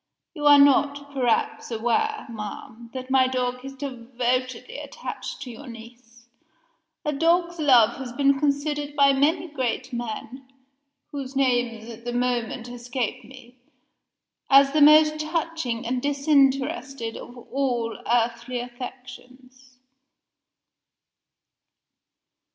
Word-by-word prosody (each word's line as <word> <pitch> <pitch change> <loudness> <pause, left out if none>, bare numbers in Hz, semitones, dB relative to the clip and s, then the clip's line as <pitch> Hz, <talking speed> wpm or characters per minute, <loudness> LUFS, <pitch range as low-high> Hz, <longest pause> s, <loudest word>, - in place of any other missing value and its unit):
"You 295 -3 -1
are 290 0 +9
not, 285 0 +3
perhaps, 250 -4 0
aware, 240 - -1
ma'am, 230 +2 -8
that 260 0 -7
my 260 -1 +5
dog 250 -1 -2
is 270 0 -8
devotedly 255 - -3
attached 485 -10 -7
to 250 - -8
your 245 +5 -11
niece. 235 0 -13 0.8
A 300 - 0
dog's 340 +3 +1
love 245 -6 +5
has 265 -3 -6
been 275 +2 +2
considered 290 0 -1
by 280 -1 +5
many 295 +6 +1
great 260 -3 -3
men 240 +3 -6 0.6
(whose 275 -2 -6
names 245 -4 0
at 230 0 -10
the 240 0 -4
moment 245 -1 -1
escape 245 0 -4
me) 250 +1 -15 0.9
as 275 0 +6
the 305 +1 +2
most 305 +1 +6
touching 310 -6 -3
and 250 +1 -1
disinterested 275 -3 +1
of 245 - -10
all 245 -2 -2 0.2
earthly 240 +1 0
affections." 255 +1 -11
255 Hz, 110 wpm, -24 LUFS, 240-285 Hz, 0.9 s, are